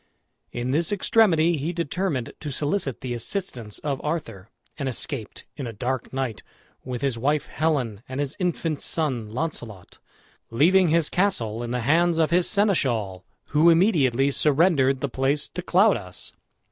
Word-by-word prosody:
In 120 +1 -3
this 165 +7 +2
extremity 180 -5 +3
he 150 +4 -2
determined 170 -5 -2
to 150 - -5
solicit 145 - -1
the 125 -2 -4
assistance 120 - -3
of 140 -3 -3
Arthur, 115 - -4 0.3
and 140 -2 -1
escaped 125 -2 -4
in 135 -4 -5
a 115 - -6
dark 125 +4 -3
night, 130 -5 -3 0.4
with 125 0 -5
his 130 -4 0
wife 145 +4 +1
Helen 135 -10 -1
and 130 +1 -4
his 145 -1 -2
infant 165 -4 -1
son 130 -9 -1
Launcelot, 115 - -5 0.5
leaving 175 +10 +4
his 165 -1 +2
castle 120 - 0
in 120 - -4
the 125 0 -2
hands 165 +6 +2
of 160 -1 +2
his 175 0 +3
seneschal, 120 - +1 0.3
who 155 +3 +5
immediately 140 - +3
surrendered 140 -3 +3
the 140 - 0
place 135 +3 0
to 180 - -5
Claudas. 180 - +1
140 Hz, 150 wpm, -24 LUFS, 120-170 Hz, 0.5 s, who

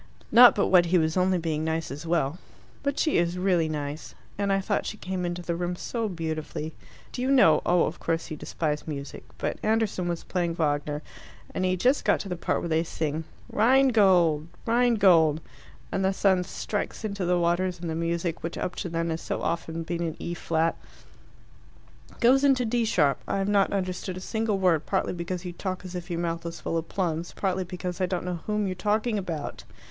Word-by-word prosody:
Not 245 +1 +9
but 200 - +1
what 180 -2 +6
he 180 +2 +3
was 160 -1 +1
only 185 0 +3
being 160 -2 -2
nice 160 -1 -2
as 150 +4 -7
well. 165 -1 0 0.4
But 280 0 -1
she 310 - +2
is 175 +1 0
really 180 -4 +2
nice. 150 0 -5 0.2
And 200 0 0
I 195 - +3
thought 200 +1 -1
she 215 - -5
came 185 -2 -3
into 175 0 -4
the 170 -1 -2
room 175 +1 -2
so 225 +4 -3
beautifully. 160 -2 -4 0.4
Do 250 - -5
you 260 - 0
know 240 - +6
oh, 175 0 +4
of 165 - -3
course, 165 0 -2
you - - -2
despise 150 0 -3
music 140 -2 -6
but - - -3
Anderson 215 -5 0
was 170 -1 -3
playing 170 -3 -1
Wagner, 150 -1 -1 0.5
and 185 - -1
he'd 185 -1 0
just 260 +3 +3
got - - +3
to 195 - -7
the 180 - -2
part 170 - -1
where - - -3
they 160 0 +2
sing 160 -1 -3 0.3
'Rheingold! 205 - +4 0.2
'Rheingold! 200 -10 +4 0.5
and 195 - 0
the 190 +1 +2
sun 190 -2 +2
strikes 210 +4 -4
into 200 -2 -3
the 180 0 +2
waters, 175 +1 +1
and 170 - -5
the 160 - -2
music, 170 +1 -2
which 165 - -4
up 180 - -2
to 180 - -3
then 165 0 -1
has 160 - -3
so - - -3
often 165 0 -2
been 170 +1 -3
in 165 -2 -2
E 170 - -4
flat 165 -1 0 0.7
" - - -25
"Goes 260 +3 +5
into 265 -3 +4
D 235 +1 +1
sharp. 150 - +2
I - - 0
have 195 0 0
not 200 -1 +3
understood 185 -1 -3
a - - -5
single 220 +2 -1
word, 175 -5 +2
partly 190 - 0
because 175 +1 -4
you 175 - -5
talk 185 +1 -4
as 180 - -7
if 180 0 -6
your 170 - -2
mouth 165 -1 -2
was 170 0 -6
full - - -3
of 165 - -9
plums, 170 -3 -2
partly 185 -1 0
because 180 +1 -5
I 185 - +2
don't 180 -1 -2
know 180 -2 -3
whom 210 -1 0
you're 190 - -1
talking 210 +3 0
about." 165 -6 -5
175 Hz, 210 wpm, -27 LUFS, 165-195 Hz, 0.7 s, Not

